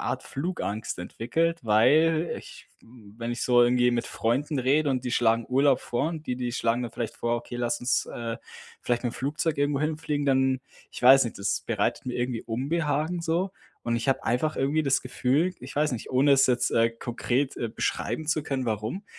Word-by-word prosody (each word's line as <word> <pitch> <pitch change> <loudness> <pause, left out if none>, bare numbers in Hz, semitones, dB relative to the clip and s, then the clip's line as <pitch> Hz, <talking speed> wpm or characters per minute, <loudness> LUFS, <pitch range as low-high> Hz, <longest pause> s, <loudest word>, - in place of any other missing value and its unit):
Art - - -2
Flugangst 135 - -4
entwickelt, 165 - -1
weil 155 +10 +4
ich - - -13 0.5
wenn 115 0 -4
ich 120 - -4
so 120 -1 +5
irgendwie 125 0 +4
mit 120 - -1
Freunden 135 +6 -1
rede 140 +4 +2
und 130 -1 -1
die 125 - -2
schlagen 115 -1 +2
Urlaub 135 +1 +3
vor 120 +5 -1
und 160 -2 -6
die 125 - -1
die 125 -1 -2
schlagen 115 +1 0
dann 120 - -4
vielleicht 115 -1 -4
vor: 120 0 0
„Okay, 120 +1 -8
lass 120 -1 -1
uns, 125 +1 +1
äh, 115 -1 -5 0.5
vielleicht 120 0 0
mit 120 - -1
dem - - -12
Flugzeug 150 +3 -1
irgendwo 145 0 +1
hinfliegen“, 150 -1 -1
dann 130 -1 +2 0.3
ich - - -9
weiß 135 +2 +8
nicht, 115 - -6
das 100 +2 -1
bereitet 110 +3 -1
mir 125 - -3
irgendwie 120 -1 -2
Unbehagen 150 +6 -1
so. 170 +4 0 0.3
Und 120 - 0
ich 115 +3 -3
habe 135 - +1
einfach 125 +7 0
irgendwie 145 +4 +1
das 135 - +2
Gefühl- 135 +8 0
ich 130 +2 -9
weiß 150 -1 +2
nicht- 115 - -5
ohne 135 +3 +4
es 135 -1 +5
jetzt, 125 -1 +2
äh, 115 0 +3
konkret, 120 +3 -2
äh, 120 - -2
beschreiben 135 +6 -2
zu 155 0 +1
können, 135 -3 -2
warum, 110 - -3
130 Hz, 200 wpm, -26 LUFS, 120-150 Hz, 0.5 s, weiß